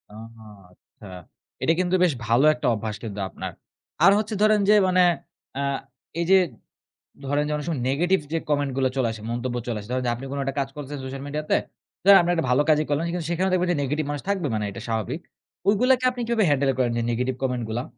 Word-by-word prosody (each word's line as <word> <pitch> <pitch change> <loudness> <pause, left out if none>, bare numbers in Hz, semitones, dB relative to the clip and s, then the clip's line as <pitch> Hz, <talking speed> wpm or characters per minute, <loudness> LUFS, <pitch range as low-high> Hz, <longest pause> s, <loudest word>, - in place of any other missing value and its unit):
আহা 115 +1 -12 0.3
আচ্ছা। 100 +3 -17 0.6
এটা 165 - +4
কিন্তু 185 0 +1
বেশ 175 -4 +3
ভালো 120 +6 +4
একটা 155 - -3
অভ্যাস 110 0 -4
কিন্তু 105 -3 -6
আপনার। - - -6 0.5
আর 195 - +8
হচ্ছে 215 +1 -2
ধরেন 215 0 +5
যে - - +8
মানে 185 0 +3 0.6
আ - - 0 0.6
এইযে 180 +3 +5 0.9
ধরেন 145 +2 +1
যে - - -3
অনেক 150 - -4
সময় 155 -7 -2
নেগেটিভ 175 +8 +2
যে - - +2
কমেন্টগুলো 135 -3 +1
চলে 130 -3 +2
আসে, 110 - -9
মন্তব্য 120 +1 -3
চলে 115 -3 -2
আসে। 105 - -10
ধরেন 130 0 -1
যে 120 - +2
আপনি 125 +3 -8
কোন 140 - -4
একটা 135 0 -3
কাজ 135 0 -1
করছেন 145 0 -6
সোশ্যাল 135 +1 -6
মিডিয়াতে। 150 +1 -1 0.5
ধরেন, 195 +1 +9
আপনি 175 - -1
একটা 165 -5 0
ভালো 135 +4 +4
কাজই 155 0 +4
করলেন 145 +2 0
কিন্তু 175 -2 -3
সেখানেও 185 +2 0
দেখবেন 180 -1 +1
যে 160 - -2
নেগেটিভ 150 +3 -1
মানুষ 145 - -4
থাকবে। 190 -6 0
মানে 105 -1 -1
এটা 115 - -8
স্বাভাবিক। 115 +8 -2 0.5
ওইগুলাকে 250 +5 +3
আপনি 245 -1 -6
কিভাবে 230 -3 +2
হ্যান্ডেল 140 -1 +2
করেন 125 -2 +2
যে - - +1
নেগেটিভ 125 +2 -1
কমেন্টগুলা? 120 -2 -2
145 Hz, 205 wpm, -24 LUFS, 125-175 Hz, 0.9 s, ধরেন